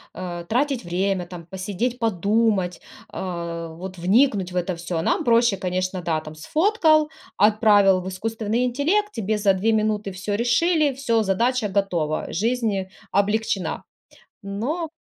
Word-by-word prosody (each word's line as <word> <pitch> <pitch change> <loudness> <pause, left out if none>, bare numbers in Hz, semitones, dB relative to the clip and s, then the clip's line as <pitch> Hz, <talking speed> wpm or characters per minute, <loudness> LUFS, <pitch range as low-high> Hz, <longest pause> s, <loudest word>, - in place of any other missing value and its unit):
э, 175 -1 -6
тратить 265 +2 0
время, 180 +1 -1
там, 175 -2 -9
посидеть, 200 +7 -3
подумать, 205 -3 +1 0.3
а, 170 -2 -5
вот 180 +3 -8
вникнуть 195 0 +2
в 180 - -9
это 180 0 -1
всё. 170 0 -4
Нам - - +1
проще, 235 -3 +3
конечно, 185 0 -2
да, 165 -2 0
там, 155 0 -9
сфоткал, 310 - +2 0.3
отправил 205 -2 +5
в 185 - -5
искусственный 220 +4 -2
интеллект, 335 - +1
тебе 215 - -1
за 200 -2 +3
2 200 +4 +1
минуты 215 -2 0
всё 195 +3 -4
решили, 285 - +2
всё, 235 -4 +1
задача 225 +3 +1
готова, 180 -6 -1
жизнь 215 -2 0 0.2
облегчена. 205 -1 0 0.6
Но 255 - -3
205 Hz, 135 wpm, -23 LUFS, 185-235 Hz, 0.6 s, отправил